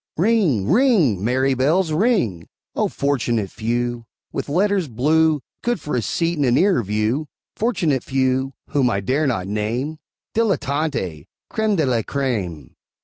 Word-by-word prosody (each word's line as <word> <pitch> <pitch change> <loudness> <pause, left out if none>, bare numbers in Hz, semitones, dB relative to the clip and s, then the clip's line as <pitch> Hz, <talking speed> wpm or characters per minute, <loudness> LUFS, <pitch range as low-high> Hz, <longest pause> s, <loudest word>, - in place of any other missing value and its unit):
Ring, 175 - +2
ring! 180 - +3
merry 130 +4 +2
bells, 155 +7 +2
ring! 155 - +1 0.3
O - - +1
fortunate 120 -7 -1
few, 120 +1 -2 0.3
With - - -4
letters 190 +2 +1
blue, 150 +5 +2 0.2
Good 240 0 0
for 150 - -4
a 120 - +1
seat 165 +8 -1
and 145 - +2
a - - +3
nearer 185 +3 +3
view! 110 +8 -1 0.3
Fortunate 170 - 0
few, 130 0 0 0.2
whom 135 -4 +2
I 100 - 0
dare 140 +9 +1
not 95 -8 -1
name; 115 +9 -2 0.3
Dilettanti! 140 - -1 0.2
Créme 220 -3 +1
de 160 -5 +2
la 120 -3 +1
Créme! 110 - -3
135 Hz, 145 wpm, -21 LUFS, 115-165 Hz, 0.3 s, ring